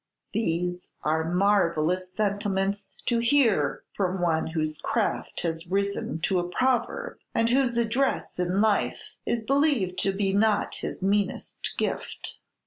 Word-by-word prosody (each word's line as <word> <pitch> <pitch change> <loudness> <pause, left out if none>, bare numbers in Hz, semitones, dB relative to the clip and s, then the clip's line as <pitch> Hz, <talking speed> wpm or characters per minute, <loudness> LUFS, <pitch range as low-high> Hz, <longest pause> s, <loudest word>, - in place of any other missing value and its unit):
"These 180 -3 -1 0.2
are 160 +2 +1
marvellous 180 -2 +2
sentiments 200 0 -1 0.2
to 235 -2 +2
hear 230 - +3
from 190 -1 0
one 165 -2 +1
whose 155 -2 -2
craft - - -1
has 165 0 -3
risen 195 -4 -1
to 185 +1 +2
a 175 0 -3
proverb, 260 - 0 0.2
and 230 - +3
whose 250 -2 +2
address 235 -2 0
in 180 +2 +1
life 215 -2 +2 0.3
is 235 -1 0
believed 275 - +2
to 195 - +2
be 195 0 0
not 210 +1 +2
his - - -4
meanest 200 0 -1
gift." - - -3
195 Hz, 135 wpm, -27 LUFS, 175-220 Hz, 0.3 s, hear